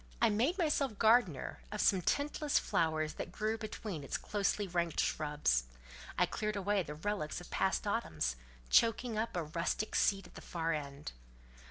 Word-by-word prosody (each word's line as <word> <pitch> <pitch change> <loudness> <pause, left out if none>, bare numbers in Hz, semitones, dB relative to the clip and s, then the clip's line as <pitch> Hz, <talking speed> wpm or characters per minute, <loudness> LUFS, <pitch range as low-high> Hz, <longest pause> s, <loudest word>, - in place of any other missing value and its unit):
I - - +4
made 250 - +2
myself 290 - +1
gardener 220 - +3
of 210 - -4
some 190 -3 +4
tintless 290 - +1
flowers 155 -1 +1
that - - -6
grew 215 +3 -1
between 210 -7 -5
its - - -2
closely 205 0 -1
ranked 170 -2 -1
shrubs; 145 - +1 0.5
I 180 - +5
cleared 210 +4 -2
away 200 0 +1
the 150 -3 -6
relics 180 -2 -2
of 175 - -12
past 190 - +1
autumns, 80 - -1 0.4
choking 230 0 +4
up 220 -3 -1
a 170 - 0
rustic 170 +7 -2
seat 195 -1 +2
at - - -15
the - - -10
far 165 -1 -2
end. 145 -1 -5
195 Hz, 165 wpm, -34 LUFS, 155-215 Hz, 0.5 s, I